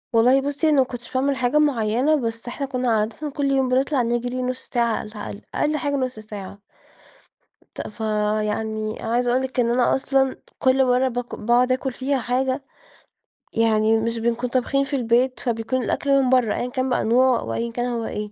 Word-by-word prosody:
والله 250 +4 +5
بُصّي، 285 +3 0
أنا 300 - +3
ما - - +6
كنتش 245 -1 -8
باعمل 275 +2 +1
حاجة 255 +2 +1
معيّنة، 260 0 +2
بس 230 -4 -3
إحنا 275 +3 -3
كنّا 255 -3 -1
عادةً 225 +8 -1
كل 280 0 -1
يوم 265 -1 +2
بنطلع 265 +2 +2
نجرى 240 +2 -1
نص 255 0 -2
ساعة 235 -2 +1
على - - -5
الأقل، 210 -1 -8
أقل 305 +1 +1
حاجة 285 -1 -1
نص 255 -4 -2
ساعة. 205 -2 -9 1.2
ت - - -5
فيعني 215 0 -2
عايزة 240 +2 0
أقول 255 +1 +2
لِك 260 -1 -2
إن 235 -1 +1
أنا 245 0 +3
أصلًا 270 0 +1 0.2
كل 265 +1 +3
مرّة 255 +1 +2
بك 245 0 -4
باقعد 240 +3 +2
أكل 260 0 -1
فيها 270 +2 -1
حاجة، 260 +3 -1 0.9
يعني 220 -1 +3
مش 230 +1 -1
بنكون 235 +2 -1
طابخين 265 +2 +1
في 280 +1 -3
البيت 250 +1 +1
فبيكون 240 +1 -1
الأكل 275 +4 +2
من 255 - +1
برّه، 250 -4 +3
أيًا 245 - -2
كان 260 +1 -1
بقى 250 - +1
النوع 250 +2 +3
أو - - -5
أيًا 235 0 -2
كان 240 +1 -2
هو 235 -2 -2
إيه، 210 0 -5
245 Hz, 190 wpm, -23 LUFS, 230-265 Hz, 1.2 s, ما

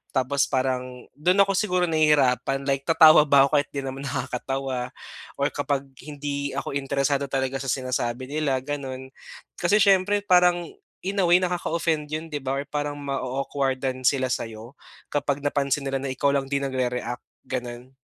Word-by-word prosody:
tapos 135 +2 +1
parang 130 -1 -2
do'n 180 +6 +2
ako 195 - -1
siguro 185 -3 +1
nahihirapan 140 -4 +2
like 135 0 0
tatawa 160 -2 +8
ba 140 -1 +6
'ko 150 - -1
kahit 145 - -2
di 140 - -3
naman 135 +1 -5
nakakatawa 130 -1 -3 0.5
or - - +2
kapag 140 -1 -1 0.2
hindi 145 -1 -4
ako 140 - -3
interesado 140 0 0
talaga 135 0 -1
sa 135 - -6
sinasabi 130 -1 -2
nila, 145 -4 0
gano'n. 130 -2 -5 0.5
Kasi 175 +4 +2
siyempre 200 0 +4
parang 180 -3 +4 0.4
in 200 +2 -2
away 175 +1 +5
nakaka-offend 170 -3 -1
'yon 155 +1 -3
'di 145 - -2
ba 135 +1 -1
or 140 - -4
parang 145 0 -3
ma-o-awkward-dan 135 -1 -2
sila 130 -2 +2
sayo 115 +3 -5 0.4
kapag 145 -1 0
napansin 140 0 0
nila 135 0 -1
na - - -2
ikaw 140 +2 +1
lang 135 -1 -1
di 140 - +1
nagre-react, 125 -2 -2 0.2
gano'n. 125 0 -5
140 Hz, 155 wpm, -25 LUFS, 130-150 Hz, 0.5 s, tatawa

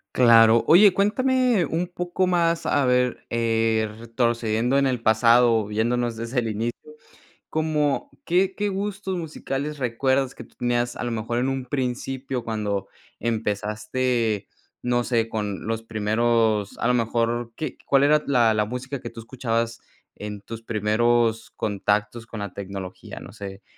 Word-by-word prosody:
Claro. 115 -2 +6
Oye, 190 +3 +7
cuéntame 245 0 +2
un 170 +4 -2
poco 180 +1 -1
más, 170 -2 +1
a 145 -2 +2
ver, 125 0 +1
eh, 115 -2 +1
retrocediendo 115 +1 0
en 140 -1 +3
el 125 -3 -2
pasado, 115 +2 +5
o 105 - -1
viéndonos 120 +2 0
desde 115 +3 -2
el 115 - -2
inicio, 115 +7 -4 0.6
¿como 155 - 0
qué 185 +2 +2
qué 205 0 -1
gustos 195 -1 -3
musicales 150 -2 -4
recuerdas 130 +2 0
que 120 - -9
tú - - -21
tenías 120 0 -1
a - - -5
lo 120 - -2
mejor 115 +1 -2
en 130 +2 0
un 135 -1 -3
principio 130 -1 -3
cuando 105 -3 -2 0.3
empezaste, 110 0 -1 0.4
no 120 0 +1
sé, 115 -2 0
con 105 -3 -3
los 115 0 -1
primeros, 110 -1 +1
a - - 0
lo 125 - +3
mejor 115 0 0
qué 155 -4 -5
cuál 140 0 +4
era 150 +1 +4
la 120 -5 +4
la 105 -1 +1
música 125 +3 -5
que 120 - -6
tú 115 0 -10
escuchabas 115 -1 -2 0.3
en 105 -1 -7
tus 115 +2 -8
primeros 115 +1 +1
contactos 105 +2 -1
con 115 -2 -7
la 100 -3 -5
tecnología? 95 -2 -7
No - - -11
sé 100 -2 -8
120 Hz, 155 wpm, -24 LUFS, 110-135 Hz, 0.6 s, Oye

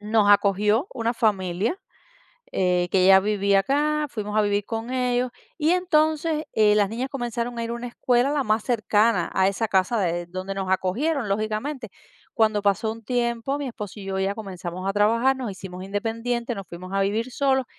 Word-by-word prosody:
nos 210 -1 +2
acogió 210 - +3
una 235 -1 -1
familia, 205 - 0 0.7
eh, 180 -1 +1
que 185 -1 +4
ya 190 0 +8
vivía 200 -1 +2
acá, 300 +5 +1
fuimos 210 -1 -3
a - - +5
vivir 205 0 0
con 225 +2 -4
ellos, 250 -1 0 0.3
y 315 +1 +2
entonces, 315 -3 +1
eh, 210 -1 +5
las 205 -2 +3
niñas 245 +4 -3
comenzaron 240 -2 -3
a 230 - -2
ir 230 - -4
una 235 +1 -5
escuela, 245 +2 +1
la 290 -2 0
más 215 -1 +1
cercana 215 -5 +2
a 190 0 +3
esa 210 +3 -1
casa 190 +4 +2
de 175 -2 -1
donde 185 +2 -5
nos 190 -1 -3
acogieron, 240 - 0
lógicamente. 215 +5 -2 0.5
Cuando 215 -2 +2
pasó 205 +2 +1
un 230 0 -11
tiempo, 240 +2 -1
mi 285 - -4
esposo 210 -3 -7
y 195 - -8
yo 190 0 -2
ya 195 +1 0
comenzamos 185 -3 -6
a - - +1
trabajar, 230 +6 +3
nos 255 -4 -4
hicimos 185 -1 -8
independiente, 230 +4 -2
nos 195 -2 -7
fuimos 185 +2 -9
a 195 - +2
vivir 220 +5 -1
solos, 265 -1 +1
220 Hz, 185 wpm, -24 LUFS, 195-245 Hz, 0.7 s, ya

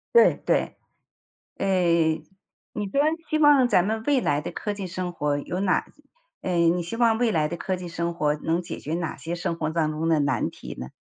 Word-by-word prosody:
对 470 - +7
对， - - +1 0.8
诶， 170 -4 +2 0.5
你 210 - -3
说 240 +9 0 0.3
希 310 - +2
望 290 -4 +6
咱 180 -6 +3
们 220 +1 -1
未 285 -3 +3
来 145 -10 +1
的 150 - -5
科 210 - -4
技 200 -2 -5
生 180 0 -4
活 145 -3 -1
有 180 +5 -4
哪 195 -2 +2 0.6
诶， 170 -2 +2
你 175 +1 0
希 170 +7 -5
望 230 -2 +3
未 240 -1 +2
来 155 -5 +1
的 170 - -4
科 185 +2 -2
技 180 -1 -7
生 170 0 -3
活， 150 -3 +1
能 165 +3 -1
解 170 -1 -6
决 155 - -4
哪 170 -1 -3
些 165 +1 -5
生 170 -1 -3
活 155 -2 -2
当 160 -1 0
中 160 +2 -2
的 160 -2 +3
难 140 - 0
题 - - -9
呢？ 65 - -6
175 Hz, 230 characters per minute, -25 LUFS, 160-200 Hz, 0.8 s, 对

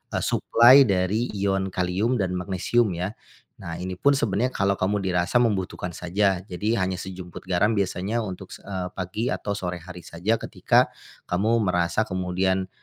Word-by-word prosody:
eee, - - -1
suplai 125 +3 +6
dari 100 +5 +1
ion 95 -1 0
kalium 95 +7 0
dan 95 -6 -1
magnesium 95 +2 0
ya. 90 +4 -3 0.5
Nah 85 - -7
ini 90 0 -5
pun 140 - +4
sebenarnya 120 -1 0
kalau 100 0 +1
kamu 100 +2 0
dirasa 95 +5 +1
membutuhkan 95 -5 -1
saja, 95 +2 0
jadi 105 +5 -1
hanya 95 -1 0
sejumput 90 -1 -7
garam 105 +5 +2
biasanya 100 +3 -1
untuk, 95 -2 -7
s - - -11
eee, 95 -2 -5
pagi 100 +7 -2
atau 100 0 -3
sore 90 -3 -4
hari 90 0 -11
saja 100 +7 -1
ketika, - - +1 0.3
kamu 110 +6 +1
merasa 90 +3 +1
kemudian, 95 0 -1
95 Hz, 160 wpm, -25 LUFS, 90-105 Hz, 0.5 s, suplai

